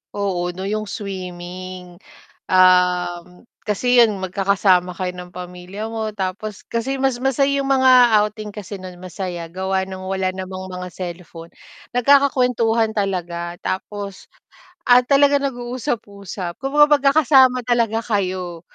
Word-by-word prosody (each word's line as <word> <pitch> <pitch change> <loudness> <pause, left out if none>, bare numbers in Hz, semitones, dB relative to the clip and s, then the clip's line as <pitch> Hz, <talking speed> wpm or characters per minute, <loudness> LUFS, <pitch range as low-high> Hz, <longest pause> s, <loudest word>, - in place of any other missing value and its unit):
Oo 185 -3 -1
'no, 190 - -4
yung 215 +1 -3
swimming. 185 -2 -7 0.5
Um, 180 0 +2 0.2
kasi 245 +4 +1
yun 220 -5 +4
magkakasama 190 -1 +2
kayo 180 0 -4
ng 180 0 -9
pamilya 180 +3 -7
mo 220 -1 -3
tapos 205 +1 -4
kasi 250 +4 -2
mas 265 -2 +1
masaya 275 +1 +1
yung 270 - -3
mga 260 -1 +5 0.3
outing 210 0 -3
kasi 205 -1 -7
nun, 185 -1 -10
masaya 180 -1 -5
gawa 190 +2 -2
ng 190 0 -7
wala 190 0 -1
namang 185 0 -6
mga 180 0 -6
cellphone, 170 -2 -8 0.5
nagkakakuwentuhan 250 -4 +3
talaga 175 -4 -3
tapos 200 +1 -5 0.6
at 245 -2 +5
talaga 285 +1 +4
nag-uusap-usap 235 -8 -4
kung 270 +1 -3
magkakasama 280 -3 +5
talaga 230 -2 +1
kayo. 185 -5 -2
195 Hz, 120 wpm, -20 LUFS, 180-240 Hz, 0.6 s, mga